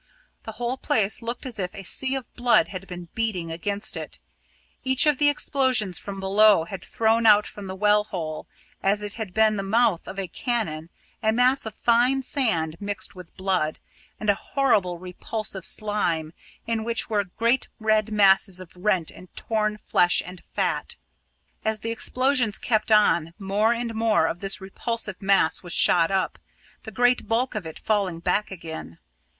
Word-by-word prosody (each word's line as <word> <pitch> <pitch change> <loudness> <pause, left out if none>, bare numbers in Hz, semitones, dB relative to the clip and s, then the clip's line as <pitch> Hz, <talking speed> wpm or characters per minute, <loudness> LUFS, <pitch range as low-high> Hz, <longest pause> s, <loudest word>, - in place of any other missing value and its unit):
The 220 - -6
whole 240 +3 -3
place 215 -4 0
looked 235 +2 -5
as 240 -4 -5
if 180 +1 -3
a 195 - -8
sea 265 +8 -1
of 265 -2 -6
blood 240 -3 +3
had 190 0 -7
been 175 -2 -8
beating 195 -8 -2
against 200 +5 -2
it. - - -6 0.7
Each 260 +1 +4
of 295 -3 +3
the 290 -1 +5
explosions 260 - 0
from 195 -1 -7
below 200 -1 +5
had 190 +3 -8
thrown 225 0 +2
out 210 -1 +6
from 205 -2 -9
the 190 - -5
well 210 +1 +3
hole, 160 -6 -5 0.3
as 205 +2 +1
if 205 0 -5
it - - -13
had 220 -5 -5
been 215 +1 +3
the - - -1
mouth 205 -2 +1
of 195 - -7
a 195 -1 -3
cannon, 170 -6 -3 0.3
a 220 -1 +2
mass 250 +2 +2
of 220 - -7
fine 245 +3 +2
sand 170 - 0
mixed 205 +1 -4
with 180 -3 -13
blood, 185 -5 0 0.4
and 215 - -5
a - - +2
horrible 205 -8 +1
repulsive 190 +2 -4
slime 170 -7 -1 0.3
in 225 -1 -1
which 230 0 0
were 210 -2 +1
great 230 +7 0
red 215 -1 +2
masses 195 -2 +4
of 185 -2 -11
rent 180 -3 0
and 185 - -14
torn 215 -1 -1
flesh 175 -4 +2
and 180 0 -10
fat. - - -2 0.7
As 220 0 -1
the 230 - -3
explosions 255 -1 +1
kept 220 -1 0
on, 175 -6 +3
more 205 +2 +1
and 235 -1 -2
more 220 -6 +2
of 165 +1 -2
this 195 +1 -3
repulsive 210 +1 -4
mass 195 -4 +2
was 175 -2 -5
shot 165 -2 +4
up, 190 -1 -1 0.5
the 220 - -7
great 245 +2 +2
bulk 235 +4 0
of 205 -6 -4
it 160 - -8
falling 200 -5 0
back 210 +5 0
again. 160 - -8
210 Hz, 180 wpm, -25 LUFS, 185-230 Hz, 0.7 s, out